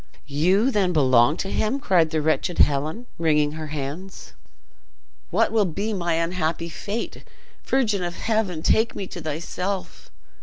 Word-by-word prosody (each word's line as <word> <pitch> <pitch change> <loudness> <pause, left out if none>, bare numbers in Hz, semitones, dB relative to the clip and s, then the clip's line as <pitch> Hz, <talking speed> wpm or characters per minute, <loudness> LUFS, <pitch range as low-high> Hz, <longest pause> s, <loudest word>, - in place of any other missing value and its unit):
"You 185 - +2
then 195 -6 +1
belong 130 -1 +4
to 195 - -3
him?" 235 +6 0
cried 175 - +3
the 155 -1 -1
wretched 160 +3 0
Helen, 150 - +2
wringing 150 -3 +2
her 155 0 -6
hands. 150 +6 -6 1.0
"What - - +2
will 220 -2 +3
be 200 +5 -2
my 175 -4 0
unhappy 165 0 -1
fate! 205 +7 -5 0.4
Virgin 225 -7 +1
of 175 -1 -3
heaven, 215 -8 -1
take 225 +1 +2
me 195 - -4
to 175 - -8
thyself!" 175 +5 -4
175 Hz, 145 wpm, -24 LUFS, 155-200 Hz, 1.0 s, belong